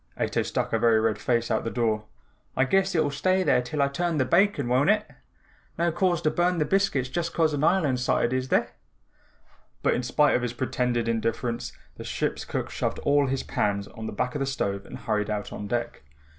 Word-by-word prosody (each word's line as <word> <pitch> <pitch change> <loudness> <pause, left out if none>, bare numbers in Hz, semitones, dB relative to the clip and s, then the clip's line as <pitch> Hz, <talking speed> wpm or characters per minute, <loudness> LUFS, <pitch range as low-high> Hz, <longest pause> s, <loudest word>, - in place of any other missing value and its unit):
Ato - - 0
stuck - - -2
a 115 - +2
very 115 -1 +4
red 110 -2 0
face 115 +2 0
out 110 - +1
the 115 - -2
door. 110 -3 0 0.5
"I 130 - +4
guess 195 +5 +1
it'll 155 -3 +2
stay 185 +6 +1
there 125 - +3
till 140 +4 -1
I - - +3
turn 170 +3 -1
the 130 - +2
bacon, 170 -2 +2
won't 130 +7 +3
it? 210 0 +2 0.7
No 170 0 +1
cause 175 0 +1
to 155 - +2
burn 175 +1 +1
the 155 - +1
biscuits 195 -7 +1
just 170 +6 -3
'cause 160 -2 +2
an 145 0 -1
island's 150 -8 +2
sighted 120 -1 +1
is 130 0 -1
there?" - - +2 1.1
But - - +3
in - - 0
spite 145 +4 +3
of 125 - +1
his 120 -1 -2
pretended 125 -2 -1
indifference, 115 +1 -2 0.3
the - - -7
ship's - - -2
cook - - -4
shoved - - -2
all 145 -1 +3
his 135 0 -1
pans 100 -1 -1
on 110 0 -7
the - - -4
back 125 +4 -2
of 145 - -3
the 135 - -1
stove 100 -7 -2
and - - -8
hurried 105 -1 -1
out 105 -1 -3
on 105 - -6
deck. 120 +2 -3
130 Hz, 215 wpm, -26 LUFS, 115-165 Hz, 1.1 s, very